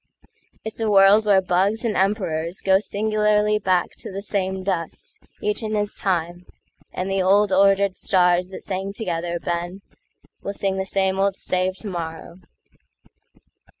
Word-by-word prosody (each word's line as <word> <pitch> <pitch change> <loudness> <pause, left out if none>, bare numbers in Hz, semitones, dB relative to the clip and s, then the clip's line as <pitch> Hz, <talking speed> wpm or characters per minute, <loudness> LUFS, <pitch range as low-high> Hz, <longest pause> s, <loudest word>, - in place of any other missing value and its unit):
It's 220 +1 -5
all 225 - +1
a - - +1
world 200 +2 +6
where 195 -2 +5
bugs 195 +6 +1
and 225 - +1
emperorsGo 190 -1 +1
singularly 210 0 +1
back 185 -3 +1
to - - -6
the 195 +1 -5
same 190 -2 -2
dust, 185 - -3 0.2
Each 420 -6 -1
in 215 -1 -2
his 205 0 -1
time; 175 -1 -2 0.4
and 185 - -3
the 195 0 0
old, 200 +2 +3
ordered 195 0 +4
starsThat 180 0 +1
sang 195 0 -4
together, 175 -4 -3
Ben, 175 +3 -4 0.6
will 200 - -4
sing 195 -1 -2
the 190 - -2
sameOld 195 0 +1
stave 185 0 -1
tomorrow." 170 -3 -6
195 Hz, 140 wpm, -22 LUFS, 180-205 Hz, 0.6 s, world